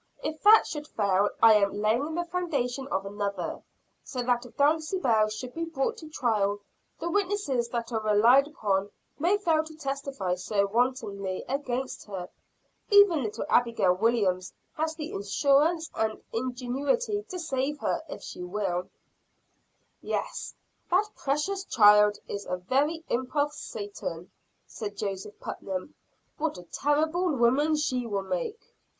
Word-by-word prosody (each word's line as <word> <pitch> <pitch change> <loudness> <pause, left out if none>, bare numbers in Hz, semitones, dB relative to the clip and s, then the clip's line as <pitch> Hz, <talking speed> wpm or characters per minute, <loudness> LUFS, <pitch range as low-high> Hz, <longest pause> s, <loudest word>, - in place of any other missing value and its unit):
If 310 0 -4
that 430 +2 +8
should 295 -1 -5
fail, 200 -3 +2
I 225 -1 +9
am 200 -1 +2
laying 235 +9 +1
the 345 0 -1
foundation 280 -8 -2
of 190 -6 -2
another 200 -3 -3 0.4
so 250 -3 -4
that 245 0 0
if - - -20
Dulcibel 290 - +2
should 245 +4 -6
be 330 0 -3
brought 300 -5 -2
to 315 - -10
trial, 210 -8 +1 0.4
the 335 - -3
witnesses 360 - 0
that 235 0 -3
are 225 -1 -1
relied 230 +6 +5
upon 200 -9 -1 0.3
may 355 +7 +3
fail 325 -6 +2
to 315 0 -11
testify 275 - -3
so 200 +3 0
wantonly 200 -4 -1
against 265 -1 -3
her. 185 -3 -6 0.6
Even 405 -7 +6
little 215 -4 -3
Abigail 230 -6 +3
Williams 190 -3 +1 0.2
has 315 +1 -1
the 315 0 -6
assurance 285 - +2
and 220 -1 -1
ingenuity 260 - -1
to 370 - -5
save 290 -3 -2
her, - - 0
if - - -7
she - - -8
will." 180 -1 -2 1.1
"Yes, - - -3 0.3
that 390 +4 +3
precocious 300 +8 -1
child 210 -1 +6
is 200 0 -5
a 180 - -1
very 280 - 0
imp 255 +4 -2
of 295 0 +2
Satan," 200 - -6 0.3
said 205 -2 -7
Joseph 200 0 -5
Putnam. 190 +7 -5 0.5
"What 310 -8 -1
a 180 - -9
terrible 310 - +1
woman 265 +6 +3
she 255 -5 -1
will 200 -3 -2
make." 190 - -3
250 Hz, 145 wpm, -28 LUFS, 205-305 Hz, 1.1 s, I